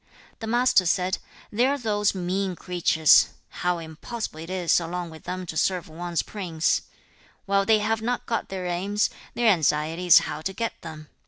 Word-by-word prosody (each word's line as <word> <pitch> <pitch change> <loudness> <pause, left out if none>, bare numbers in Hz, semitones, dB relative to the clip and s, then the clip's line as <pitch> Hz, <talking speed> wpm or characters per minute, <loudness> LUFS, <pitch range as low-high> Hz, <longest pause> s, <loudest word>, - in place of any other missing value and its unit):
The 225 - -5
Master 240 -5 +3
said, 185 +2 +1 0.3
'There 245 +6 +2
are - - -2
those 210 -5 0
mean 185 +1 -2
creatures! 165 -3 +4 0.3
How 180 0 +1
impossible 165 +4 -6
it 165 +2 -8
is 180 -2 +2
along 170 0 -5
with 160 - -13
them 185 0 -4
to 160 - -7
serve 180 +1 0
one's 170 +1 -3
prince! 170 -6 -1
2. - - -22 0.6
'While 195 0 +2
they 220 - +6
have 220 +1 0
not 245 +2 -2
got 230 - -2
their 190 -1 -4
aims, 195 +4 0 0.2
their 235 -2 +3
anxiety 160 0 +1
is 175 - +9
how 150 - -5
to 190 +4 -3
get 230 +3 -2
them. 155 -2 -9
180 Hz, 180 wpm, -25 LUFS, 165-210 Hz, 0.6 s, is